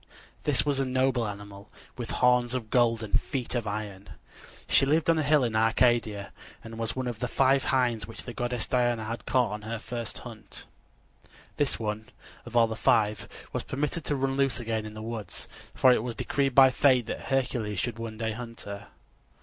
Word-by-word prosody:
This 145 -2 +3
was 145 -2 +1
a - - +2
noble 130 -2 +1
animal, 100 -1 -9 0.3
with - - -6
horns 125 0 +2
of 115 -4 -4
gold 115 -2 +3
and 105 - +1
feet 130 -4 -4
of 120 -3 -1
iron. 100 -2 -5 0.6
She - - +5
lived 155 +4 +3
on 165 - +2
a - - +2
hill 150 -1 +4
in 115 -3 -1
Arcadia, 110 -2 +2 0.3
and 115 0 -9
was 115 0 -1
one 130 0 -2
of 120 -3 -4
the 125 - -1
five 135 +1 +3
hinds 120 -5 +1
which 115 - -7
the 120 - -7
goddess 120 -1 -1
Diana 120 -3 +1
had 115 +2 -6
caught 125 -5 +2
on 105 0 -5
her 115 +2 -4
first 115 0 -5
hunt. 110 -4 -11 0.9
This 145 -2 +1
one, 110 +1 -4 0.4
of 120 0 -2
all 115 - +7
the 110 0 -4
five, 105 -1 +2 0.3
was - - -1
permitted 150 +4 -2
to 145 - 0
run 135 0 0
loose 135 -3 +1
again 110 -2 -2
in 105 - -10
the 110 - -7
woods, 110 -4 -5 0.3
for 130 - +6
it - - +1
was 120 0 -4
decreed 135 -2 0
by 135 -1 +8
fate 130 -3 +4
that - - -5
Hercules 125 -6 -1
should 115 +3 -2
one 115 -1 -6
day 110 0 -1
hunt 115 +1 -7
her. 100 0 -8
120 Hz, 200 wpm, -28 LUFS, 110-130 Hz, 0.9 s, by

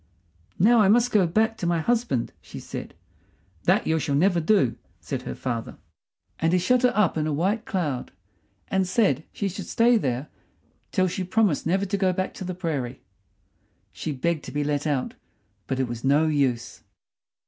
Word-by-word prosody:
"Now 230 +5 +5
I 210 - +5
must 240 +4 +4
go 195 -5 +4
back 220 +6 +1
to 175 - -2
my 170 -1 +1
husband," 225 - 0
she - - -10
said. - - -7 0.7
"That - - +3
you 160 0 +1
shall 140 -1 -1
never 175 +4 +3
do!" 160 - +2 0.2
said - - -4
her - - -6
father. 120 -3 -4 0.6
And 165 +1 +1
he - - +5
shut 245 +8 +2
her 250 -1 +4
up 200 -6 +2
in 155 - 0
a - - -1
white 195 +10 0
cloud 150 - -2 0.6
and 190 -1 +1
said 180 - +2
she 200 - -2
should 190 - -6
stay 235 +1 +4
there 130 - -2 0.6
till 185 -2 +2
she 185 +1 -3
promised 185 -5 +1
never 190 +4 +1
to 200 +1 -1
go 190 -2 +2
back 185 +1 -2
to - - -7
the 185 0 -4
prairie. 140 -8 -3 0.9
She 155 - -4
begged 155 +3 -1
to - - -7
be 145 0 -1
let 145 +1 -1
out, 140 -4 -1 0.5
but 135 -1 -2
it 130 - +1
was 120 -1 -6
no 145 +4 +4
use. 135 -6 0
170 Hz, 185 wpm, -25 LUFS, 145-200 Hz, 0.9 s, Now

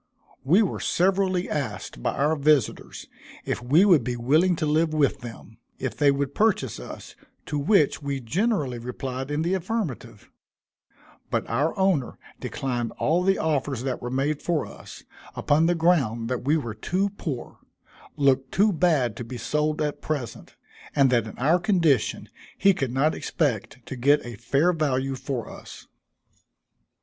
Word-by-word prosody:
We 175 +11 +4
were 195 - -2
severally 185 0 +1
asked 140 - -4
by - - -1
our 150 +3 +2
visitors, 145 -3 0 0.4
if - - -2
we 145 +10 +4
would 170 - +5
be 125 0 -2
willing 155 +10 +3
to 155 - -2
live 155 +1 +1
with 145 -3 +2
them, 115 -1 -11 0.2
if 130 - -4
they 145 - +3
would 140 0 0
purchase 205 - +1
us, - - -10 0.3
to 150 - -2
which 150 0 +3
we 140 -1 -3
generally 145 - -1
replied 130 +2 -5
in 145 +2 -1
the 175 +3 0
affirmative; 190 - -4 1.0
but - - -1
our 145 - 0
owner 190 -10 +1 0.2
declined 120 -3 -3
all 165 +4 +1
the 195 +1 +2
offers 140 -5 -1
that 130 -2 -3
were 120 - -4
made 140 +3 -1
for 170 -4 0
us, - - -12 0.3
upon 155 +3 +2
the 175 - +2
ground 135 -10 +1
that 125 -1 -3
we 150 +3 +3
were 120 -8 -4
too 185 - -1
poor 150 -11 -6 0.6
looked 135 -2 +2
too 205 +1 +3
bad 155 - +2
to - - -5
be 120 +2 -7
sold 150 +5 -1
at 150 -1 -3
present 140 -7 -5 0.4
and 135 -2 +4
that 120 -3 +2
in - - -10
our 155 +8 +3
condition 170 - +1 0.3
he 195 - +5
could 135 -8 -2
not 140 +5 +2
expect 125 - -2
to - - -6
get 140 +3 +3
a 120 -1 -7
fair 140 - +1
value 135 -4 0
for 130 -2 -4
us. - - -11
145 Hz, 160 wpm, -25 LUFS, 125-170 Hz, 1.0 s, would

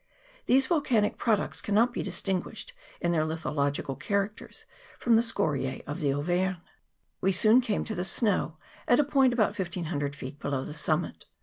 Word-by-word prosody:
These 265 +1 +5
volcanic 255 -10 +1
pro 225 -2 +3
ducts 200 - -4
cannot 225 +4 +2
be - - -2
distinguished 195 - -3 0.3
in 175 - +1
their 165 -2 +2
lithological 145 -3 -2
characters 200 +4 -3 0.3
from 235 -1 +3
scoriae 155 - -1
of 145 - -5
the 145 -2 +1
Auvergne. 175 +6 0 0.6
We 195 - +3
soon 220 +6 +5
came 220 -5 -1
to 220 - -4
the 180 -3 -2
snow, 185 -4 0 0.3
at 245 - +5
a - - +6
point 270 -2 +3
about 215 -3 +1
1500 160 -6 -3
feet 140 +1 -8
below 135 -2 -2
the 150 - -6
summit. 155 +2 -1
190 Hz, 165 wpm, -28 LUFS, 155-225 Hz, 0.6 s, a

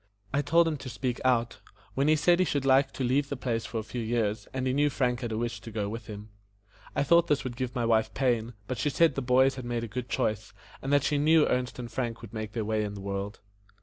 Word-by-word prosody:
I 140 - +2
told 165 +4 +4
him 155 -2 -1
to 135 - -8
speak 120 +2 -3
out, 120 -4 +1 0.3
when 135 +2 +1
he 155 - +5
said 175 +4 +3
he 185 - +4
should 140 -4 -1
like 135 +1 +4
to 135 - -3
leave 140 +3 +1
the 140 - -3
place 115 -3 -2
for 115 - -5
a 110 - -2
few 115 +3 -5
years, 110 -3 -1
and 130 -1 -3
he 130 - +1
knew 145 +2 +3
Frank 125 -3 0
had 120 -2 -3
a 110 - -2
wish 120 +1 -3
to - - -9
go 105 -2 -2
with 115 0 -7
him. 105 0 -8 0.7
I - - +2
thought 170 +3 +4
this 145 - +1
would 125 -2 -5
give 130 +1 -4
my 120 -2 0
wife 110 -1 +2
pain, 120 -3 0
but 125 +2 -4
she 145 - +1
said 165 +4 +4
that - - -17
the - - +1
boys 130 +2 +4
had 130 - -5
made 120 -1 -2
a - - -3
good 120 +3 -5
choice, 110 -3 -1 0.3
and 135 - -3
that 145 -2 +4
she 145 -1 +1
knew 155 +1 +5
Ernest 125 0 -1
and 120 -2 -6
Frank 120 -3 -3
would 115 -1 -10
make 110 -1 -5
their 115 -3 -2
way 110 0 0
in 100 -1 -4
the 100 - -7
world. 100 +1 -4
125 Hz, 280 wpm, -28 LUFS, 110-135 Hz, 0.7 s, he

